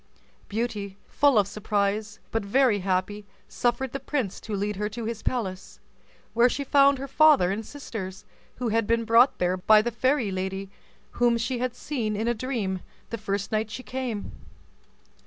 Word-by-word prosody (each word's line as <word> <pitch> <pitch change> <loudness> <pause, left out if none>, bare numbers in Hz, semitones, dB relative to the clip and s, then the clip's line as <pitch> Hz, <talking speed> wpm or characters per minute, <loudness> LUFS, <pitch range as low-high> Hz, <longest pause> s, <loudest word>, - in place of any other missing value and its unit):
Beauty, 205 -3 -3
full 285 -5 +3
of 200 -2 +4
surprise, 205 +1 -1
but 225 -2 -1
very 230 +1 +3
happy, 190 +2 -1 0.2
suffered 245 +1 -1
the 275 - -4
prince 260 -7 -2
to 215 - -4
lead 205 0 -2
her 210 +1 -1
to 225 +1 -6
his 225 -1 -4
palace, 195 -7 -3 0.5
where 235 +2 +5
she 280 - -2
found 280 0 +5
her 275 +1 -5
father 280 -9 +5
and 210 +3 -3
sisters, 205 -8 -7 0.3
who 245 -2 -2
had 225 -1 +1
been 230 0 +1
brought 230 +4 +5
there 180 +1 +1
by 215 +3 +5
the 240 - -1
fairy 250 -1 +1
lady 190 +1 -4 0.4
whom 240 -1 +2
she 235 +2 -2
had 250 0 -2
seen 230 -7 -3
in 220 +3 -1
a 240 - +3
dream 220 -6 -2 0.3
the 230 - -2
first 200 -1 -3
night 215 0 0
she 255 +4 -7
came. 245 -3 -4
220 Hz, 175 wpm, -26 LUFS, 200-250 Hz, 0.5 s, where